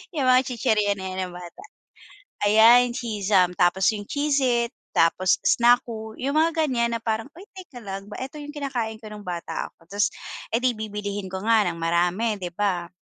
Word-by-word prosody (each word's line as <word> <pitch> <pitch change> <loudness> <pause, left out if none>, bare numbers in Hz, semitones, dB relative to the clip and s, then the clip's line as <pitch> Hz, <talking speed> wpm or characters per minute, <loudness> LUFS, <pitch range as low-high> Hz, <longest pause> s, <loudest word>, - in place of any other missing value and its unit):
Yung 270 -3 0
mga 255 +1 +5
chichirya 225 -5 0
na' 190 - -5
yan - - -7
nung - - -12
bata. 175 - -11 0.8
Ayan, 235 +3 +6
Cheez-Zum, 205 -6 +1
tapos 180 +2 +3
yung 205 -2 -6
Cheez-It, 265 -5 +1 0.2
tapos 180 +3 +3
Snacku, 235 -2 +2
yung 280 +4 0
mga 325 0 +2
ganiyan. 235 -3 0
Na 230 - -4
parang, 220 +2 -2
uy, 365 - -11
teka 355 - -12
lang 195 0 -6
ba, 210 - -9
eto 275 +3 -8
yung 295 0 -9
kinakain 245 -6 -3
ko 215 - -9
nung 205 -2 -10
bata 175 -1 -4
ako, 165 - -26
ta's 205 +1 +2 0.5
edi 250 +2 +2
bibilihin 205 -2 -4
ko 190 +1 -6
nga 220 -3 +3
ng 170 - -2
marami, 180 +6 0
'di 180 -1 -5
ba? 185 -4 -1
220 Hz, 180 wpm, -24 LUFS, 195-250 Hz, 0.8 s, Ayan